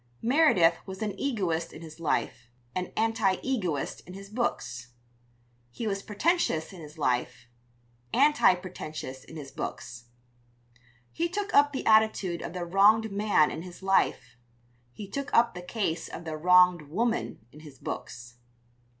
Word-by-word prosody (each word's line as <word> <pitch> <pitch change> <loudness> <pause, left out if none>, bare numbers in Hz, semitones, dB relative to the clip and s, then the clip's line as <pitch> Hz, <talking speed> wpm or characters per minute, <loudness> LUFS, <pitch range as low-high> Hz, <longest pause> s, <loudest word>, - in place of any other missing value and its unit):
Meredith 245 - +4
was 190 +2 -5
an 210 -2 -2
egoist 185 -11 -1
in 165 - -11
his 160 0 -11
life, 125 -6 -2 0.2
an 180 0 -3
anti 225 -3 +2
egoist 185 - -2
in 180 - -9
his 195 +1 -11
books. 125 - -3 0.8
He 170 - -6
was 200 -2 -1
pretentious 210 - 0
in 180 - -10
his 150 +1 -12
life, 125 -6 -1 0.7
anti 285 -7 +5
pretentious 155 -7 -7
in 165 - -13
his 140 -3 -8
books. 120 -6 -6 1.1
He 340 +1 -1
took 410 +4 -3
up 290 0 +5
the 265 - -4
attitude 215 -5 +3
of - - -6
the 180 -1 -4
wronged 210 +5 +4
man 200 -6 +3
in 160 - -5
his 180 +1 -11
life; 125 -10 +1 0.5
he 200 +10 -9
took 275 +8 -5
up 235 0 +4
the 180 - -7
case 180 -3 -2
of 170 - -8
the 160 -1 -4
wronged 180 -1 +4
woman 225 - -2
in 150 - -14
his 150 -4 -13
books. 120 -1 -7
180 Hz, 150 wpm, -28 LUFS, 155-220 Hz, 1.1 s, anti